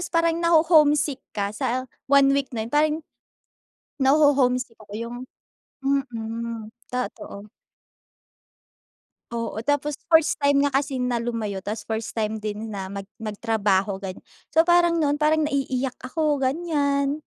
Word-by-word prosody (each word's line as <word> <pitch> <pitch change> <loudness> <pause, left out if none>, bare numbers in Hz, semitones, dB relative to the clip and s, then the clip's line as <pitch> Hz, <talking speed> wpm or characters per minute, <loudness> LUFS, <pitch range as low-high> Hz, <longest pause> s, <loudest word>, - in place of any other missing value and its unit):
Tapos 355 - -4
parang 335 0 +1
naho-homesick 310 -4 +4 0.2
ka 200 0 -1
sa 245 +4 -2 0.2
1 275 0 +5
week 280 -1 0
na 220 - -1
'yon, 230 - -10
parang 300 +1 +3 1.1
naho-homesick 265 -4 +3
ako, 205 - -15
yung 235 +1 -5 0.7
mm. 230 -4 -2 0.2
Totoo. 230 -4 -5 1.9
Oo, 230 -2 -3
tapos 290 0 0
first 320 -3 +4
time 280 -1 +3
nga - - 0
kasi 275 -3 -3
na 245 -1 0
lumayo, 230 -4 -3
tas 210 +2 -5
first 220 0 -4
time 220 -1 -1
din 215 +1 -5
na 195 -2 -5
mag 195 +1 -6 0.2
magtrabaho 210 -3 0
ganyan. 195 -1 -7 0.3
So 325 - +7
parang 345 -1 +3
noon 290 0 +1
parang 310 +1 +3
naiiyak 270 -2 -2
ako, 295 +2 -1
ganyan. 280 0 0
260 Hz, 130 wpm, -24 LUFS, 220-295 Hz, 1.9 s, So